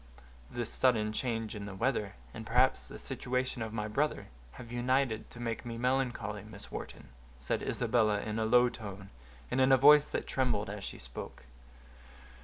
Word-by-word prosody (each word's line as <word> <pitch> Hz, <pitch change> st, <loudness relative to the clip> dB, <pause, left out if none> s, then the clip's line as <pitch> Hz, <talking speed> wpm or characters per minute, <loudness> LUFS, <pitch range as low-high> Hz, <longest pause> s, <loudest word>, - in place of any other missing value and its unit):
"This 120 Hz, -2 st, -3 dB
sudden 110 Hz, -4 st, +2 dB
change 115 Hz, -3 st, -2 dB
in 100 Hz, -1 st, -6 dB
the 100 Hz, -, -7 dB
weather, 105 Hz, -3 st, 0 dB, 0.2 s
and 110 Hz, -, -7 dB
perhaps 125 Hz, +3 st, +3 dB
the -, -, -8 dB
situation 125 Hz, -1 st, -2 dB
of 110 Hz, -1 st, -3 dB
my 105 Hz, -1 st, -2 dB
brother, 145 Hz, +8 st, -1 dB, 0.2 s
have 120 Hz, -2 st, -10 dB
united 120 Hz, -1 st, 0 dB
to 120 Hz, -, -11 dB
make 115 Hz, -1 st, -3 dB
me 115 Hz, -1 st, -5 dB
melancholy, 120 Hz, -5 st, -1 dB
Miss 105 Hz, -1 st, -10 dB
Wharton," -, -, -7 dB, 0.3 s
said 65 Hz, -, -1 dB
Isabella, 110 Hz, -4 st, +2 dB
in 110 Hz, +1 st, -3 dB
a 110 Hz, -, +1 dB
low 125 Hz, +2 st, +6 dB
tone, 100 Hz, -5 st, -8 dB, 0.4 s
and 130 Hz, +1 st, +2 dB
in 130 Hz, +1 st, +5 dB
a 135 Hz, -, +8 dB
voice 150 Hz, +2 st, +7 dB
that -, -, -2 dB
trembled 115 Hz, -6 st, 0 dB
as 105 Hz, -1 st, -6 dB
she -, -, -6 dB
spoke. -, -, -8 dB
115 Hz, 175 wpm, -32 LUFS, 105-125 Hz, 0.4 s, a